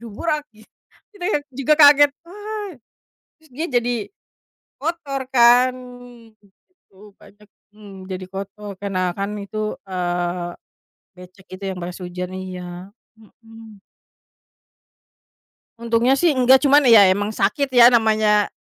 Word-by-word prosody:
gitu. 235 0 -5 0.5
Kita 380 -3 -10
yang 295 -8 -1
juga 275 +4 +1
kaget, 290 -1 +7
"Wah!" 415 +2 -7 0.7
terus 315 - -24
dia 315 +7 -4
jadi, 245 0 0 0.9
kotor 290 -3 -4
kan 245 +1 +5 1.0
gitu, 210 - -21
banyak 210 +1 -20 0.3
mmm, 200 -3 -13
jadi 185 0 -6
kotor 200 +1 -8
karena 185 -2 -3
kan 200 +1 -3
itu, 215 +1 -5
eee, 175 -1 -3 0.7
becek 185 +1 -16
itu 195 - -10
yang 185 - -7
pas 175 0 -7
hujan 180 +1 -6
iya, 180 0 -8 0.3
mhm. 225 -1 -17 2.0
Untungnya 235 +3 +1
sih 340 -4 +2
enggak 260 +2 +4
cuman 285 +2 +5
ya 215 -4 +8
emang 205 +2 -2
sakit 215 +7 -1
ya 245 -1 +6
namanya 215 -2 +2
220 Hz, 115 wpm, -20 LUFS, 190-270 Hz, 2.0 s, ya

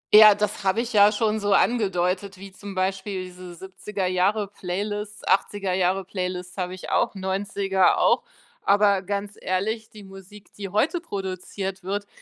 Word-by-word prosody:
Ja, 215 -1 +10
das 210 -1 -2
habe 195 +4 +2
ich 240 0 -5
ja 205 -1 +7
schon 220 0 0
so 205 -1 +1
angedeutet, 195 -3 +1
wie 195 +1 -10
zum 200 0 -9
Beispiel 190 +1 -2
diese 180 -1 -10
70er 190 +2 -5
Jahre 195 +3 +1
Playlists, 205 +2 -5
80er 200 0 +1
Jahre 185 +1 +1
Playlists 180 -1 -5
habe 180 -1 -3
ich 185 - -8
auch, - - +1
90er 195 0 +1
auch. - - +3 0.4
Aber 200 -1 +3
ganz 200 +1 -4
ehrlich, 215 +4 -2
die 210 -1 -13
Musik, 195 +1 -14
die 200 -1 -5
heute 215 - +1
produziert 195 - -5
wird, 200 +2 -3
195 Hz, 155 wpm, -24 LUFS, 185-205 Hz, 0.4 s, Ja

